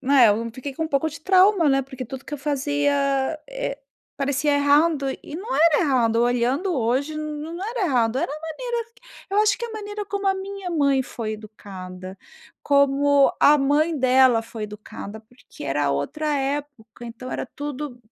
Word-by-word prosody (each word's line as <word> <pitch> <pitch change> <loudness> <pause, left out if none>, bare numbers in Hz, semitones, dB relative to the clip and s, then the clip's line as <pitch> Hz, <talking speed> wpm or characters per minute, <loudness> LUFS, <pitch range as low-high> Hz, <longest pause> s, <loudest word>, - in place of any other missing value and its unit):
né, 270 -3 +5
eu 225 +3 +1
fiquei 265 +3 -6
com 320 +4 -3
um - - -4
pouco 300 +2 0
de 305 - -10
trauma, 375 -1 +4
né, 270 0 +3
porque 260 -1 -8
tudo 265 +3 -8
que - - -12
eu 295 - -3
fazia, 285 0 0 0.5
eh, - - -4 0.4
parecia 280 +1 0
errado 285 +1 +3
e - - -10
não 370 +1 -5
era 315 0 +5
errado. 250 -8 +2
Olhando 245 +9 +1
hoje, 265 +3 0
n 305 - -4 0.2
não 330 +3 -7
era 460 -6 -1
errado, 245 -3 +1
era 335 -1 -1
a 305 - -7
maneira 465 +8 -4 0.4
eu 400 - +1
acho 420 -2 +3
que 475 - -4
a 470 - -6
maneira 415 -1 -6
como 400 0 -1
a 385 - +3
minha 385 -1 -6
mãe 280 -5 +2
foi 225 -3 -5
educada, 190 -3 -9 0.5
como 280 0 +4
a 295 +1 +6
mãe 295 +3 +2
dela 255 -2 +4
foi 225 -1 -8
educada, 210 0 -8
porque 245 +3 -14
era 145 +1 0
outra 220 - -2
época, 270 -5 -4
então, 235 +2 -8
era - - -3
tudo 290 -2 -5
280 Hz, 180 wpm, -23 LUFS, 245-320 Hz, 0.5 s, a